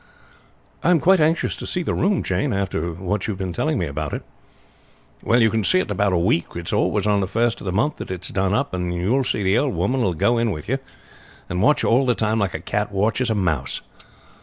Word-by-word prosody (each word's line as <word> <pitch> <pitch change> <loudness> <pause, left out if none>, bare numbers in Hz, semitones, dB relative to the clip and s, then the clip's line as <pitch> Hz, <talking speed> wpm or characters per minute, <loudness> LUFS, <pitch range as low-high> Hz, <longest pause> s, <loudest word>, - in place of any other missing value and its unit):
"I - - +3
am 175 -2 +5
quite 190 +4 +4
anxious 160 +2 +1
to - - -7
see 180 - -2
the - - -1
room, 195 -1 +1
Jane, 95 +2 -1
after 95 -4 -2
what 95 +3 -3
you 110 - -1
have - - -9
been 95 -2 -4
telling 155 - 0
me 90 - 0
about 75 0 -4
it." - - -4 1.0
"Well, 120 - +2
you 110 - +4
will 110 -1 0
see 185 - +4
it - - +3
in - - -3
about 100 0 +1
a 90 - +2
week. 85 0 +1
It's 85 -1 -4
always - - +1
on 105 -1 +3
the 95 - -1
first 115 +3 0
of - - -9
the 90 - -1
month 115 +11 0
that - - -7
it 90 -1 -4
is - - -4
done 95 0 0
up; 140 +7 0
and 90 -1 -2
you 90 +4 -1
will 135 0 +2
see 105 -4 -1
the 95 +5 +3
old 140 -1 -1
woman 130 +1 0
will 95 -7 +1
go 120 +9 +2
in 115 -1 +1
with 75 -7 -5
you, 135 +5 0 0.7
and 90 +1 -1
watch 150 +7 +3
you - - +2
all 130 +3 +3
the 125 - +3
time 110 0 0
like 100 -4 -1
a - - -3
cat 105 0 -2
watches 110 +5 +1
a 110 - +1
mouse. 80 -9 -1
105 Hz, 265 wpm, -22 LUFS, 90-125 Hz, 1.0 s, am